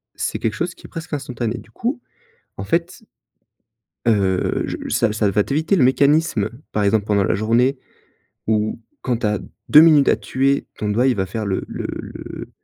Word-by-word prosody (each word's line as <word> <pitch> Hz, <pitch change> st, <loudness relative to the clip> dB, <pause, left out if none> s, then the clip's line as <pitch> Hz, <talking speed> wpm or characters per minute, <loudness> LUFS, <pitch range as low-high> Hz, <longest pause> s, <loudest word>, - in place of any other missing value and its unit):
c'est -, -, -3 dB
quelque 110 Hz, -, -1 dB
chose 170 Hz, +9 st, -3 dB
qui -, -, -16 dB
est -, -, -23 dB
presque 165 Hz, -2 st, -8 dB
instantané. 125 Hz, -4 st, -3 dB
Du 115 Hz, -, -13 dB
coup, 245 Hz, -, -3 dB, 0.6 s
en -, -, -5 dB
fait 170 Hz, +6 st, -2 dB, 1.0 s
heu, 95 Hz, -5 st, +1 dB
je -, -, -4 dB
ça 110 Hz, -2 st, +1 dB
ça 110 Hz, -2 st, +1 dB
va 105 Hz, -, +2 dB
t'éviter 155 Hz, -, +1 dB
le 145 Hz, -, +4 dB
mécanisme, 140 Hz, -4 st, +3 dB, 0.2 s
par 105 Hz, -, +1 dB
exemple, 100 Hz, +1 st, +2 dB
pendant 100 Hz, -2 st, +2 dB
la -, -, +1 dB
journée 120 Hz, +6 st, +2 dB, 0.7 s
où 110 Hz, 0 st, 0 dB, 0.2 s
quand 125 Hz, -3 st, 0 dB
tu 115 Hz, -, -1 dB
as 105 Hz, -1 st, 0 dB, 0.3 s
2 150 Hz, -, +9 dB
minutes 155 Hz, -4 st, +6 dB
à -, -, +4 dB
tuer, 135 Hz, +2 st, 0 dB
ton 105 Hz, -, -2 dB
doigt 120 Hz, +5 st, +2 dB
il 125 Hz, -, +2 dB
va 95 Hz, -1 st, 0 dB
faire 110 Hz, +4 st, -4 dB
le 95 Hz, -1 st, -1 dB
le -, -, -5 dB
le -, -, -8 dB
115 Hz, 190 wpm, -20 LUFS, 105-145 Hz, 1.0 s, 2